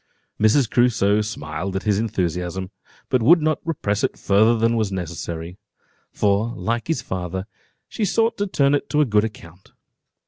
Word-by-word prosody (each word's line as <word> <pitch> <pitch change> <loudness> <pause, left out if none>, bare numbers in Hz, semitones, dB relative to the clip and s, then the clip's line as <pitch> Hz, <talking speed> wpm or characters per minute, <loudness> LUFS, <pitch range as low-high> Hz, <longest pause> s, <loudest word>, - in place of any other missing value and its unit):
Mrs. 110 +4 +4
Crusoe 110 -4 +2
smiled 95 -3 -5
at 95 - -2
his 105 -2 +1
enthusiasm, 95 -3 -2 0.4
but 130 -2 +2
would 165 +10 +6
not 155 -1 0
repress 105 -11 -2
it - - -1
further 110 +4 +3
than 115 +1 +2
was 110 -3 0
necessary; 85 0 -5 0.5
for, 105 +4 0
like 115 +1 -2
his 160 -9 -1
father, 95 0 -4 0.4
she 220 - -4
sought 225 +3 +1
to 205 - 0
turn 140 -6 +2
it 145 - -1
to 150 - +2
a - - +4
good 105 -4 +2
account. 95 -4 -11
105 Hz, 165 wpm, -22 LUFS, 95-125 Hz, 0.5 s, would